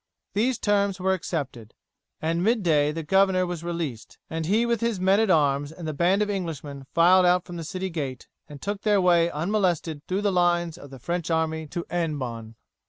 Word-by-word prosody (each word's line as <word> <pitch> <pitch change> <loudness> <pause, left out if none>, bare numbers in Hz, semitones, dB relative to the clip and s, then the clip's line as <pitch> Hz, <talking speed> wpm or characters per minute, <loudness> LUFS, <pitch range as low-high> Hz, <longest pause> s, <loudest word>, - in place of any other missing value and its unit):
These 235 +4 +1
terms 200 -2 +1
were 190 +1 +1
accepted. 135 - -5 0.5
At 165 +1 0
mid 215 +5 +1
day 150 -3 +3
the 165 +1 -5
governor 190 +2 +3
was 175 -2 -5
released, 165 -9 -5
and 160 -1 -3
he 220 +5 +2
with 235 -1 0
his 230 -4 0
men 190 +2 +3
at 220 -2 +2
arms 145 -3 +2
and 160 0 -8
the 155 - -2
band 180 +7 +2
of 210 - -4
Englishmen 150 -7 -5
filed 180 +3 +5
out 180 0 +3
from 175 - -8
the 165 - -5
city 185 +3 -4
gate, 140 -6 -5 0.2
and 145 -1 -10
took 200 +5 -4
their 210 -2 +3
way 175 -2 +4
unmolested 170 -2 -1
through 190 +2 -1
the 205 -1 +1
lines 175 -2 +1
of 145 -5 -12
the 135 - -10
French 170 +5 -3
army 160 -1 -1
to 170 +3 -4
Hennebon. 130 -10 -3
175 Hz, 200 wpm, -25 LUFS, 155-190 Hz, 0.5 s, filed